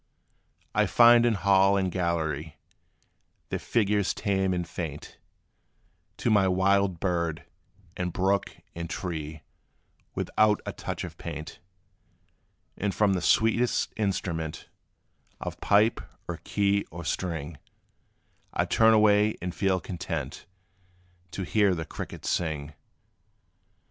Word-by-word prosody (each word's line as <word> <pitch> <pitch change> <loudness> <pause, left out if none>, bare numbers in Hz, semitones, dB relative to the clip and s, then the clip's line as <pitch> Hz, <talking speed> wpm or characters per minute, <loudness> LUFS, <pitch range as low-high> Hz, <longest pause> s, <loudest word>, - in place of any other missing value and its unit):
I - - +3
find 120 0 +6
in 115 - +2
hall 100 0 +4
and 95 -2 0
gallery, 80 -4 -2 0.9
Their - - -2
figures 105 -3 +1
tame 95 -2 0
and 90 -2 -2
faint, 80 -4 -7 1.0
To 115 - 0
my 100 -3 +4
wild 95 -1 +2
bird, 85 -4 -1 0.5
and 90 -1 -2
brook, 95 +3 +1 0.2
and 85 0 -6
tree, 80 -5 -5 0.7
Without 105 -1 +2
a - - -4
touch - - -5
of - - -8
paint. 75 -2 -7 1.2
And 100 0 -2
from 105 -2 +3
the 90 - -1
sweetest 115 +6 +2
instrument 85 -6 -3 0.7
Of - - -6
pipe, 105 +3 +3 0.3
or 85 - -4
key, 100 +2 0
or 85 0 -8
string, 80 -2 -3 0.9
I - - +1
'd - - -15
turn 110 0 +6
away, 105 0 +4
and 90 0 -4
feel 95 -1 +1
content 90 0 -5 0.8
To 95 - -5
hear 100 0 +2
the 80 -1 -4
crickets - - -7
sing. 75 -3 -2
95 Hz, 120 wpm, -27 LUFS, 85-100 Hz, 1.2 s, find